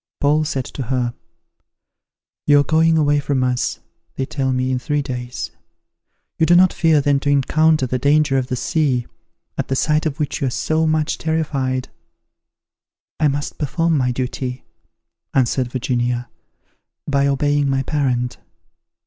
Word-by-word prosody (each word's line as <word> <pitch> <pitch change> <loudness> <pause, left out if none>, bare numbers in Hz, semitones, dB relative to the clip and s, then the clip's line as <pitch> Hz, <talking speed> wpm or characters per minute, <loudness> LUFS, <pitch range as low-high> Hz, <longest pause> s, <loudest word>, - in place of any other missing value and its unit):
Paul 150 +2 +2
said 135 -4 -2
to - - -7
her, 120 -1 -1 1.3
"You 145 -1 +6
are - - +1
going 160 +3 +3
away 145 -1 +3
from 140 -2 0
us, 125 -1 -1 0.3
they 135 - -2
tell 135 -1 -2
me, 130 0 0
in 130 - 0
three 145 +2 -1
days. 125 - -5 0.9
You 160 - +3
do 175 - +6
not 185 +1 +5
fear 160 -3 +3
then 140 0 +2
to 145 - -2
encounter 150 +1 +3
the 125 0 -2
danger 145 0 +3
of 125 - -3
the 130 - -2
sea, 130 -3 0 0.5
at - - -1
the 135 - -1
sight 155 +3 +1
of 150 +1 -5
which 150 - -2
you 135 - +1
are - - +1
so 155 +5 0
much 155 -1 0
terrified?" 140 -5 -1 1.3
"I 155 - +4
must 145 0 -3
perform 165 +3 0
my 130 -3 +1
duty," 125 0 -4 0.7
answered 130 -1 +1
Virginia, 120 -1 -1 0.8
"by 140 -1 +2
obeying 145 0 +1
my 135 0 +1
parent." 125 -4 -1
140 Hz, 155 wpm, -20 LUFS, 130-150 Hz, 1.3 s, You